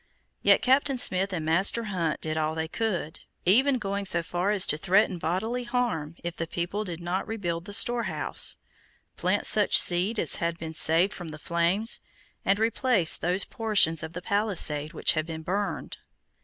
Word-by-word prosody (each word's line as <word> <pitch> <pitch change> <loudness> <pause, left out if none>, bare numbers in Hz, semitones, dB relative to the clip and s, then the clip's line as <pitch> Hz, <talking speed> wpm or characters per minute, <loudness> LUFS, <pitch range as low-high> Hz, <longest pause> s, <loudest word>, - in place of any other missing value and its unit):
Yet - - +4
Captain 270 +1 +2
Smith 195 -4 +1
and 165 -4 -4
Master 190 +8 +3
Hunt 180 -7 -3
did 155 0 -3
all 155 0 -1
they 160 0 -3
could, 180 -5 -3 0.3
even 260 +9 +4
going 200 -2 -4
so 170 -3 +3
far 175 +4 -2
as 205 -3 +4
to - - +1
threaten 185 +2 +1
bodily 220 +10 -2
harm 235 -11 -2
if 170 0 -5
the 165 - -4
people 175 +6 -3
did 175 -5 -6
not 175 +2 -3
rebuild 175 -6 -4
the - - -9
storehouse, 240 +2 +1 0.6
plant - - -1
such - - +4
seed 185 +6 +3
as - - +2
had 170 -2 -2
been 160 -1 -7
saved 165 +4 +3
from 175 - -8
the 155 -1 -8
flames, 170 +8 0 0.4
and 195 - +2
replace 225 - +1
those 180 +3 0
portions 205 -8 +2
of 160 0 -7
the 180 - -7
palisade 175 -8 -1
which - - +2
had 155 0 -2
been 160 -1 -7
burned. 200 +4 -4
180 Hz, 175 wpm, -26 LUFS, 165-210 Hz, 0.6 s, Yet